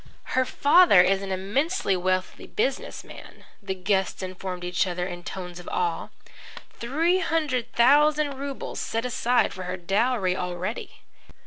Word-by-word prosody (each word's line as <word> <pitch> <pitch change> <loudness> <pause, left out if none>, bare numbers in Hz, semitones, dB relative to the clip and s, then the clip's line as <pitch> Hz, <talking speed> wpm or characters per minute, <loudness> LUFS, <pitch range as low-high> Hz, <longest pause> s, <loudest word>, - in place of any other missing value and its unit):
"Her 260 0 +3
father 285 - +6
is 195 +1 +2
an 195 -1 -5
immensely 200 - 0
wealthy 185 +1 -2
business 265 +5 -2
man," - - -13 0.2
the 195 -2 -4
guests 190 +1 -1
informed 185 -1 -6
each 180 +2 0
other 180 0 -2
in 175 -1 -6
tones 180 -1 -7
of 175 - -9
awe. 175 -2 -1 0.6
"Three 325 +10 +1
hundred 285 -9 -1
thousand 290 +3 +4
rubles 280 -1 -5
set 225 +2 -2
aside 245 0 +1
for 185 -1 -7
her 180 +1 -4
dowry 195 +1 +1
already." 180 +4 -5
195 Hz, 140 wpm, -25 LUFS, 185-265 Hz, 0.6 s, father